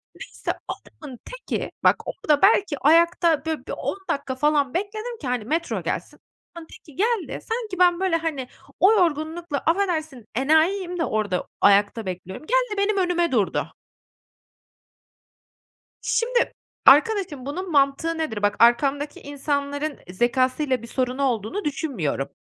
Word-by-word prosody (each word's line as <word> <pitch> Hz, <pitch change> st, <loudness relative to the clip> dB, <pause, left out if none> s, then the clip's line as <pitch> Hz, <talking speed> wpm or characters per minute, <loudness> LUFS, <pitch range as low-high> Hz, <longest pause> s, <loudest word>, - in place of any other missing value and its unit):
Neyse, -, -, -5 dB, 0.2 s
adamın 265 Hz, -6 st, -9 dB
teki, -, -, -5 dB
bak, -, -, +6 dB
orada 300 Hz, -5 st, 0 dB
belki 390 Hz, -6 st, +4 dB
ayakta, 335 Hz, +1 st, +3 dB
böyle, 320 Hz, -1 st, -3 dB
bir -, -, -5 dB
10 -, -, -3 dB
dakika 265 Hz, -2 st, -2 dB
falan 290 Hz, -1 st, +1 dB
bekledim 430 Hz, +5 st, -4 dB
ki, 275 Hz, -, -5 dB
hani, 245 Hz, -4 st, -2 dB
metro 325 Hz, +6 st, -2 dB
gelsin. -, -, -4 dB, 0.4 s
Adamın 330 Hz, -1 st, -9 dB
teki 300 Hz, -, -16 dB
geldi, 440 Hz, -1 st, -1 dB
sanki 445 Hz, -5 st, -4 dB
ben, 355 Hz, -1 st, +4 dB
böyle, 375 Hz, -3 st, +1 dB
hani, 315 Hz, -6 st, -2 dB, 0.3 s
o 405 Hz, +4 st, +6 dB
yorgunlukla, 325 Hz, -3 st, 0 dB
affedersin, 315 Hz, -, -1 dB
enayiyim 340 Hz, +6 st, +2 dB
de, 325 Hz, -, +1 dB
orada 205 Hz, -4 st, -1 dB
o -, -, -31 dB
ayakta 205 Hz, +2 st, +4 dB
bekliyorum, 185 Hz, -, -7 dB
geldi, -, -, +1 dB
benim 400 Hz, +1 st, +1 dB
önüme 350 Hz, -3 st, +1 dB
durdu. 215 Hz, -6 st, 0 dB, 2.3 s
Şimdi, 485 Hz, +1 st, 0 dB, 0.3 s
arkadaşım, 305 Hz, -, +4 dB
bunun 360 Hz, +5 st, -5 dB
mantığı 285 Hz, +3 st, +2 dB
nedir? 300 Hz, -10 st, -3 dB
Bak, 205 Hz, 0 st, +2 dB
arkamdaki 275 Hz, +5 st, +3 dB
insanların 285 Hz, +1 st, -3 dB
zekâsıyla 255 Hz, +5 st, +1 dB
bir 235 Hz, -, -9 dB
sorunu 255 Hz, +2 st, -1 dB
olduğunu 240 Hz, -, -1 dB
düşünmüyorum. 260 Hz, -, -2 dB
305 Hz, 135 wpm, -23 LUFS, 260-360 Hz, 2.3 s, bak